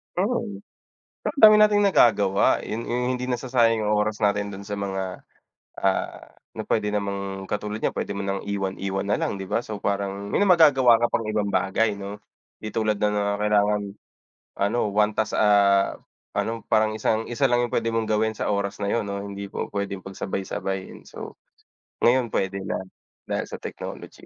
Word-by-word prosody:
Hmm. 205 +1 -1 0.6
Ang 290 - -3
dami 215 -2 +9
nating 210 -1 +5
nagagawa. 105 - +4
Yun 115 +2 -3
yung 125 +1 0
hindi 125 +1 -3
nasasayang 120 -2 +2
yung 105 - +2
oras 105 0 0
natin 100 -1 +1
dun 100 0 -9
sa 105 - -4
mga, 95 -2 -4 0.6
ah, 95 -1 -1 0.2
na - - -4
pwede 105 -1 +1
namang 100 -1 -3
katulad 105 +1 -3
niyan, - - +2
pwede - - -2
mo 100 - -3
nang 100 0 -2
iwan-iwan 95 -1 -2
na - - +2
lang, - - -1
'di 95 - -6
ba? - - +2
So, 105 -2 -6
parang 100 0 -2
may - - +1
magagawa 145 -9 +6
ka - - +3
pang 115 - 0
ibang 105 -1 0
bagay, 105 +2 +1
'no? 100 +1 -6 0.5
Di 110 - -3
tulad 110 -1 0
na 105 - +3
nga 105 -1 0 0.2
kailangan, 105 0 +2 0.8
ano, 100 +4 +1
1 105 +1 +3
task, 110 0 0
ah, 100 -2 +4 0.4
ano, 115 0 -1
parang 110 0 +3
isang 110 +1 0
isa 135 +3 +2
lang 120 0 +2
yung 120 - -5
pwede 115 - 0
mong 115 -1 0
gawin 110 +1 +1
sa - - -2
oras 100 0 -2
na 100 - 0
yun, 110 -3 0
no? 100 0 -4
Hindi 100 0 -6
pu-puwedeng 100 -1 -4
pagsabay-sabayin. 95 0 -5
So, - - -9 0.6
ngayon, 120 -1 +3
pwede 95 0 -1
na - - -2 0.5
dahil - - -1
sa - - -9
technology. - - -8
105 Hz, 175 wpm, -24 LUFS, 100-115 Hz, 0.8 s, dami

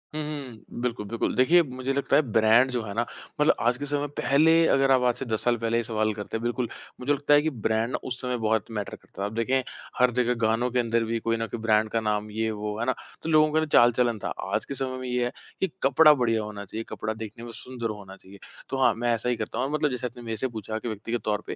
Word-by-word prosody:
हुँ, 155 - -1
हुँ, 140 -8 -7
बिल्कुल, 120 -4 -2
बिल्कुल। 115 +3 -2
देखिए, 155 +9 +5
मुझे 130 -1 -3
लगता 140 0 +1
है - - +6
ब्रांड 110 +4 +5
जो 125 -1 -1
है 100 -2 -6
ना 120 - +1 0.4
मतलब 150 - +5
आज 120 +1 +2
के 145 - -4
समय 145 0 -1
पहले 150 +4 +4 0.2
अगर 135 0 +3
आप 130 -1 +5
आज 120 - +2
से 135 - -5
10 110 -3 -2
साल 120 -1 +2
पहले 115 0 0
ये 120 - +1
सवाल 110 -1 0
करते, 105 +2 -5
बिल्कुल 120 +1 -1 0.3
मुझे 135 +3 +1
लगता 145 +1 +2
है 145 - +7
कि 160 - 0
ब्रांड 110 -2 -1
ना - - 0
उस 125 -1 -3
समय 125 -1 -2
बहुत 110 -2 +1
मैटर 105 -3 -4
करता - - -12
था। - - 0
अब 105 - -4
देखें 125 +3 +1 0.4
हर 125 0 +5
जगह 125 0 +2
गानों 110 +3 +2
के 125 - +1
अंदर 115 -1 +1
भी 115 +1 -1
कोई 115 0 0
न 115 0 -2
कोई 115 +3 -5
ब्रांड 110 -1 +2
का 115 - 0
नाम 105 -1 -1
ये 110 +1 -1
वो 105 0 -4
है 120 - -1
ना? 130 - +2 0.3
तो 165 - -3
लोगों 155 -1 +5
का 155 - +4
ना 160 - +1
चाल-चलन 120 -4 +4
था। - - -3 0.2
आज - - 0
के 140 - -5
समय 130 -1 -3
में 130 - -5
ये 125 0 0
है, 120 - -2 0.3
कि 190 - +1 0.2
कपड़ा 150 +3 +7
बढ़िया 115 -5 +1
होना 105 -1 -7
चाहिए, 110 +3 -5
कपड़ा 110 - -3
देखने 110 +1 -8
में 120 - -8
सुंदर 125 -3 -5
होना 100 -2 -8
चाहिए, 100 +1 -16 0.3
तो 135 - -2
हाँ, - - +5
मैं 120 +1 -1
ऐसा 115 +2 -1
ही 125 - +1
करता 115 - -5
हूँ 125 - +1
और 140 - -3
मतलब 155 -1 +1
जैसे 125 0 -2
आपने 120 0 -11
मेरे 115 -1 -4
से 130 - 0
पूछा 110 -2 -5
कि 120 - -6
व्यक्तिगत 115 +2 -3
तौर 105 -1 0
पे, - - -4
120 Hz, 275 wpm, -26 LUFS, 110-130 Hz, 0.4 s, है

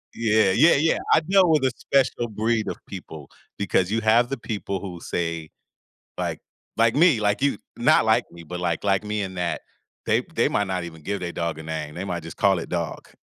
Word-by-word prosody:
Yeah. 110 -3 +3
Yeah. 155 - +5
Yeah. 160 +4 +2 0.2
I - - +6
deal 185 +1 +4
with 155 -4 +3
a 130 - +3
special 130 -3 +1
breed 110 0 -1
of - - -3
people 80 -7 -9 0.3
because 95 -2 +1
you 115 - +1
have 115 +3 +4
the 135 - -3
people 100 -4 -4
who 90 -3 -7
say 85 -2 -3 0.7
like - - -3 0.4
like 115 0 +3
me, 155 -6 +5
like 105 +3 +1
you 140 -7 +2 0.2
not - - +4
like - - +3
me, 85 -1 -12
but 90 +2 -6
like 85 0 -1
like 100 0 +2
me 105 0 -2
in 95 -1 -5
that 90 -1 -2 0.4
they - - +2
they - - +3
might 105 -1 0
not 90 -2 -2
even 80 -2 -10
give 100 +5 -3
their 85 -1 -4
dog 85 -2 -3
a - - -7
name. 80 -1 -5
They 90 +3 -4
might 85 -3 -4
just 80 - -9
call 95 -2 +3
it - - -7
"dog". 85 -4 -4
100 Hz, 220 wpm, -24 LUFS, 85-115 Hz, 0.7 s, I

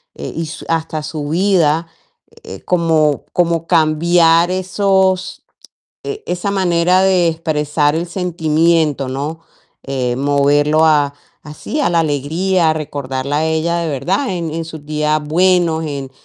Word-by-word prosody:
eh, - - -6
y 165 0 -3
su 155 - -9
hasta 160 -2 -2
su 150 -2 -5
vida, 170 -3 +2 0.6
eh, - - -9
como 160 -4 +1
como 170 -2 0
cambiar 165 +1 +3
esos, 190 0 0 0.6
eh, 420 0 -5
esa 180 +3 -2
manera 180 -1 +2
de 185 -3 +3
expresar 150 -2 0
el 170 +1 -3
sentimiento, 160 -5 0
¿no? 145 +5 -4 0.4
Eh, 130 -3 -2
moverlo 145 +2 +2
a 145 -2 +3 0.3
así, 155 - -5
a - - +2
la 170 -1 +2
alegría, 160 +4 0
a - - 0
recordarla 140 -2 -4
a 160 - 0
ella 160 +2 0
de 165 - -2
verdad 175 - -1
en 170 -4 -3
en 165 0 -3
sus 160 -2 -10
días 150 0 0
buenos, 170 0 +2
en 140 -3 -5
160 Hz, 140 wpm, -16 LUFS, 150-175 Hz, 0.6 s, cambiar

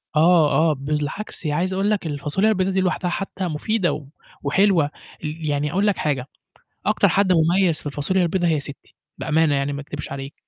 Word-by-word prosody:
آه، 160 -1 +5
آه، 160 -1 +3
بالعكس 150 +6 -3
عايز 170 +6 0
أقول 195 +2 +1
لك 205 -5 -1
الفاصوليا 150 +8 0
البيضا 190 -3 +1
دي 190 0 +1
لوحدها 180 -1 0
حتى 190 0 -3
مفيدة 175 +4 0
و 150 -2 -6 0.4
وحلوة. 170 0 +3 0.3
ي 155 +1 -4
يعني 145 0 0
أقول 200 +4 +1
لك 205 - +2
حاجة، 140 -3 -1 0.6
أكتر - - +3
حد 195 -2 +3
مميز 170 0 +3
في - - -15
الفاصوليا 150 +6 0
البيضا 175 0 +1
هي 155 -3 +1
ستي، 140 -1 -8 0.2
بأمانة 160 -2 +2
يعني 140 +1 0
ما 140 - -4
أكدبش 145 0 -7
عليك، 140 +1 -6
160 Hz, 185 wpm, -22 LUFS, 145-185 Hz, 0.6 s, آه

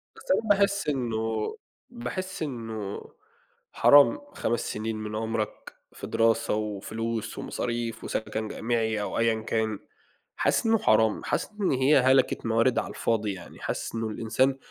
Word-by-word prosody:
بس - - -5
أنا 220 - +1
باحس 200 -2 +3
إنه 110 -5 -1 0.4
باحس 185 +10 -5
إنه 115 -7 -5 0.7
حرام 145 - +7 0.2
5 120 +1 -1
سنين 110 +1 -3
من 105 0 -5
عُمرك 110 -1 -3 0.2
في 100 - -7
دراسة 115 +1 +2
وفلوس 110 +2 -3
ومصاريف 115 -2 -3
وسكَن 110 0 -3
جامعي 110 -1 -1
أو 105 - -3
أيًا 115 -1 +2
كان، 110 -2 -1 0.6
حاسس - - +2
إنه 225 0 +4
حرام، 110 - +3
حاسس - - -2
إن 195 - +2
هي 130 +3 +4
هلَكة 130 +1 +4
موارد 115 +2 +3
على - - -4
الفاضي، 110 -3 -1
يعني 90 -2 -11
حاسس - - -4
إنه 115 0 -1
الإنسان 130 +5 +1
115 Hz, 140 wpm, -27 LUFS, 110-130 Hz, 0.7 s, حرام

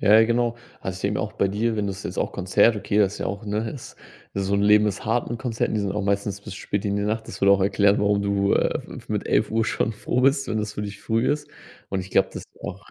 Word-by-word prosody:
Ja, 105 0 +5
ja, - - +6
genau. 120 0 +1 0.2
Also, 95 -1 -4
ich - - -9
denke 100 +1 0
mal - - 0
auch 105 - -7
bei 100 - +1
dir, 110 +3 0
wenn 105 -1 -1
das 100 0 -6
jetzt 90 - -5
auch - - 0
Konzert 95 +4 +3
okay, 105 +1 -1
das 100 -1 +3
ist - - -9
ja - - -2
auch, 100 +3 -4
ne, 105 +2 -2
ist 130 - -9 0.4
so 100 0 0
'n 100 - +2
Leben 105 +1 +5
ist 100 -2 -3
hart 115 +2 0
'n 120 - -4
Konzert 120 -3 -1
und - - -2
die 105 - +1
sind 100 - -1
auch 105 +1 -2
meistens 100 0 -1
bis 100 - -8
spät 100 +1 -3
in 100 0 0
die 100 - 0
Nacht. 110 +2 -1
Das - - -9
würde 100 - +5
auch 100 - +3
erklären, 100 +1 +3
warum 100 0 +2
du, 100 0 +1
äh, - - +1
f - - -10
f - - -12
mit - - -2
11:00 115 0 +2
schon 110 - 0
froh 120 +3 -1
bist, 135 +1 +3
wenn 110 - 0
das 105 0 -3
für 105 - -3
dich 100 -1 -6
früh 115 +2 +1
ist. 145 0 -2 0.4
Und 95 - -2
ich 90 0 -9
glaube, - - +4
das - - -6
ist - - -27
auch - - -7
105 Hz, 300 wpm, -24 LUFS, 100-110 Hz, 0.4 s, ja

